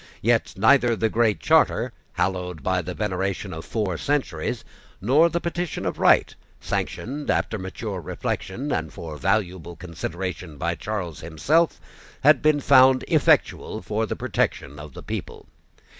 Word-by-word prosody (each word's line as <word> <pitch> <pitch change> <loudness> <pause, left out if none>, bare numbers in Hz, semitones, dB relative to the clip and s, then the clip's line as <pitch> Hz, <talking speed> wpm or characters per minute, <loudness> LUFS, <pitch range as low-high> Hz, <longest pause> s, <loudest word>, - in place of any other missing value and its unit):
Yet - - +2
neither 120 +2 +4
the 110 +1 0
Great 115 -2 +2
Charter, - - +3 0.2
hallowed 90 -3 -2
by 95 +2 +1
the 90 0 -6
veneration 95 -1 -2
of 80 0 -6
four 95 -7 -2
centuries, 125 - -2 0.3
nor 145 - +4
the 170 - -1
Petition 175 -1 -3
of - - -3
Right, - - +4 0.3
sanctioned, 145 +5 -4
after 110 - 0
mature 95 +1 -5
reflection, 120 - -4
and 80 -2 -2
for 85 -5 -8
valuable 90 0 -1
consideration, 85 -1 -6
by 85 +4 -1
Charles 85 -2 -4
himself, 140 - +1 0.4
had 150 +3 +5
been 150 -1 +3
found 130 0 +6
effectual - - +2
for - - -1
the - - -3
protection 70 +1 -2
of 75 -2 -10
the - - -9
people. - - -6
95 Hz, 145 wpm, -24 LUFS, 85-130 Hz, 0.4 s, found